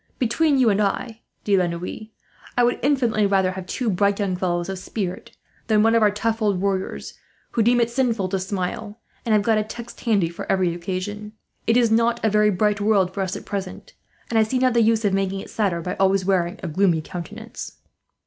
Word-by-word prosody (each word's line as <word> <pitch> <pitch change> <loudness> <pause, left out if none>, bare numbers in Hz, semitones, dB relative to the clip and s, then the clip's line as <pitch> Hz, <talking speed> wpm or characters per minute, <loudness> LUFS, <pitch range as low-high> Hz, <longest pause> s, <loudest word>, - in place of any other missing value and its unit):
"Between 280 +5 +2
you 245 -4 +4
and 200 +1 +1
I, 225 +3 -2 0.2
De 205 - +2
la 180 -2 +2
Noue, 175 +5 -6 0.5
I 245 - +5
would 240 0 +2
infinitely 240 -7 +2
rather 190 -2 +2
have 185 -1 -7
two 250 - -3
bright 200 0 +2
young 195 -3 0
fellows 175 -1 -1
of 190 -1 -4
spirit 185 -2 -5 0.3
than 215 -2 +4
one 225 0 +4
of 230 - +4
our 210 - +5
tough 225 +2 -2
old 205 -4 +1
warriors, 195 -1 -3 0.3
who 230 - +1
deem 240 +2 +4
it 235 0 +1
sinful 235 -6 0
to 195 0 -1
smile, 200 +3 -4 0.3
and 220 - +3
have 210 -1 +3
got 220 0 +3
a - - 0
text 235 +2 -9
handy 205 -7 +2
for 170 - -5
every 185 -3 +2
occasion. 190 +4 -5 0.3
It 230 +1 +4
is 235 -2 +3
not 230 +1 +2
a 220 - +3
very 210 0 +4
bright 205 +1 +1
world 200 -3 +2
for 200 - -3
us, 190 -1 -2
at - - -8
present; 200 - -6 0.4
and 225 - +3
I - - +6
see 220 +4 0
not 255 -1 +2
the 235 - +4
use 225 0 +2
of 200 - +2
making 195 0 0
it - - -9
sadder, 190 -6 0
by 180 - -4
always 195 -1 +2
wearing 180 -2 0
a - - -2
gloomy 170 0 +2
countenance." 210 +8 -8
205 Hz, 220 wpm, -23 LUFS, 190-225 Hz, 0.5 s, I